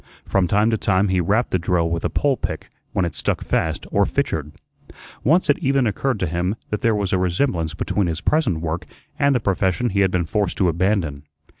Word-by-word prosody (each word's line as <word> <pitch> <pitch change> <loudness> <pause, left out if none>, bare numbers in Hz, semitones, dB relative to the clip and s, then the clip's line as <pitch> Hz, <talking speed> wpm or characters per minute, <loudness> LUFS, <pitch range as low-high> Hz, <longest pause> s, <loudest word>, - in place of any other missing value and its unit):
From 95 -2 +1
time 105 +5 +2
to 110 - 0
time 95 0 +2
he 90 -1 +2
rapped 105 +8 +1
the 95 - +2
drill 85 -1 +1
with 85 0 -2
a - - 0
pole 140 -1 +1
pick - - -5 0.2
when 95 - 0
it 85 - -4
stuck - - -1
fast 80 -1 -1
or - - +3
fitchered. 75 -1 -2 0.7
Once 165 +7 +3
it - - +3
even 135 -4 +2
occurred 110 +3 -1
to - - +2
him 90 +4 -1 0.2
that 105 - -2
there 115 -4 +2
was 100 -2 -1
a 95 - +2
resemblance 85 - 0
between 100 +2 -1
his 85 -1 -2
present 100 - +1
work 85 +2 -3 0.3
and 140 -2 +3
the - - +3
profession 100 +3 0
he 100 - 0
had 95 -1 +4
been 90 -2 0
forced 100 +2 -1
to 90 - +3
abandon. 85 -4 0
95 Hz, 215 wpm, -21 LUFS, 85-110 Hz, 0.7 s, had